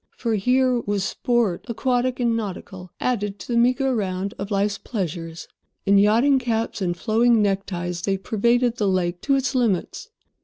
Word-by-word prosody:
For, 230 -2 -1
here 250 +4 +2
was 205 -3 -2
sport, 230 -2 0
aquatic 250 +1 0
and 235 -2 +1
nautical, 190 -3 -6
added 205 -5 -1
to 195 - -11
the - - +1
meagre 255 +2 +2
round 195 -2 -2
of 195 +1 -4
life's 200 0 0
pleasures. 165 -6 -5 0.4
In 200 0 +5
yachting 235 +7 +4
caps 230 -4 -2
and 175 -2 -1
flowing 230 +3 +3
neckties 190 -4 -1
they 195 +2 0
pervaded 235 +4 +1
the 210 - 0
lake 180 -2 0
to 275 - +2
its 270 0 0
limits. 245 - -1
215 Hz, 160 wpm, -23 LUFS, 195-245 Hz, 0.4 s, In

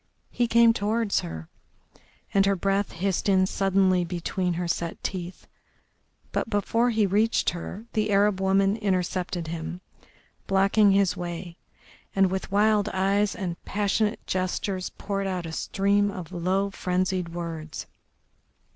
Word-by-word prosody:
He 240 - +1
came 230 0 +5
towards 220 0 0
her, 80 -1 -6 0.9
and 195 0 +4
her 200 - +3
breath 195 +2 0
hissed 190 +3 -1
in 190 -1 +4
suddenly 190 -1 +2
between 180 +1 -2
her 175 +1 -2
set 170 0 -3
teeth, 180 -1 -5 0.9
but - - -2
before 230 +3 +1
he 220 -3 +2
reached 210 +4 +2
her 185 +5 -7
the 215 -1 0
Arab 200 -1 +3
woman 195 +2 +3
intercepted 185 -4 -1
him, 170 +2 -5 0.7
blocking 200 +2 +4
his 195 -2 +3
way, 175 0 -6 0.6
and 195 -1 +4
with 190 0 -3
wild 210 0 +3
eyes 200 +2 +1
and 175 -3 -5
passionate 210 +2 0
gestures 185 0 -2
poured 195 -1 -3
out 180 -2 -3
a 165 - -5
stream 200 +4 +1
of 185 -4 -7
low, 190 +3 0
frenzied 185 -1 -1
words. 165 -2 -6
195 Hz, 135 wpm, -26 LUFS, 180-205 Hz, 0.9 s, came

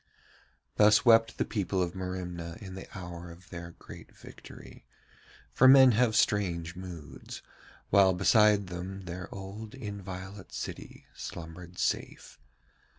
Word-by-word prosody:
Thus 105 +3 +5
wept 115 -1 +5
the - - 0
people 95 -3 -2
of 90 -1 0
Merimna 90 -3 -5
in 95 -4 -9
the 95 - -8
hour 85 -1 -8
of 90 +3 -15
their 85 -1 -8
great - - -13
victory, - - -13 0.7
for 130 - +6
men 130 -1 +9
have 115 0 +2
strange 85 -7 +1
moods, 90 -4 -9 0.5
while 95 -1 +6
beside 105 +2 +4
them 90 +2 -7
their 90 +1 -6
old 100 +4 -8
inviolate 100 -4 -8
city - - -7
slumbered 85 +1 -9
safe. - - -3
95 Hz, 125 wpm, -29 LUFS, 90-105 Hz, 0.7 s, men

